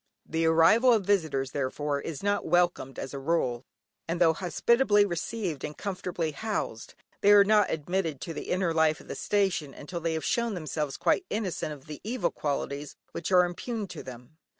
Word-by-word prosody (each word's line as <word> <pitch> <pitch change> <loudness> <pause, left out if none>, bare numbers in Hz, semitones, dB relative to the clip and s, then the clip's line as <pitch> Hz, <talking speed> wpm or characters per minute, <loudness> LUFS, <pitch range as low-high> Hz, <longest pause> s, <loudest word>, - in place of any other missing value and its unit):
The 165 0 0
arrival 190 +10 +5
of 215 -5 +3
visitors, 155 -10 +1
therefore, 140 +1 -2
is 165 +3 -6
not 205 0 +1
welcomed 175 -6 +1
as 135 - -5
a 140 - -4
rule, 135 -5 0 0.4
and 170 +1 -2
though 165 -2 +5
hospitably 205 +5 +3
received 175 -3 -3
and 150 0 -5
comfortably 180 -4 -3
housed, 150 - -4 0.3
they 205 - +6
are 205 -1 +8
not 210 +1 +4
admitted 165 +2 -1
into 155 +4 -7
the - - -6
inner 180 -2 +1
life 160 -1 +3
of - - -15
the - - -4
station 190 -9 0
until 170 +4 -6
they 165 0 -1
have 160 - -3
shown 235 -3 0
themselves 155 -4 -3
quite 375 - +1
innocent 195 -7 -2
of 145 -3 -10
the 150 -1 -9
evil 240 +4 -1
qualities 145 0 -3 0.2
which 175 - -4
are 180 -1 +6
imputed 205 +4 -4
to - - -7
them. 125 +4 -11
170 Hz, 185 wpm, -28 LUFS, 150-200 Hz, 0.4 s, are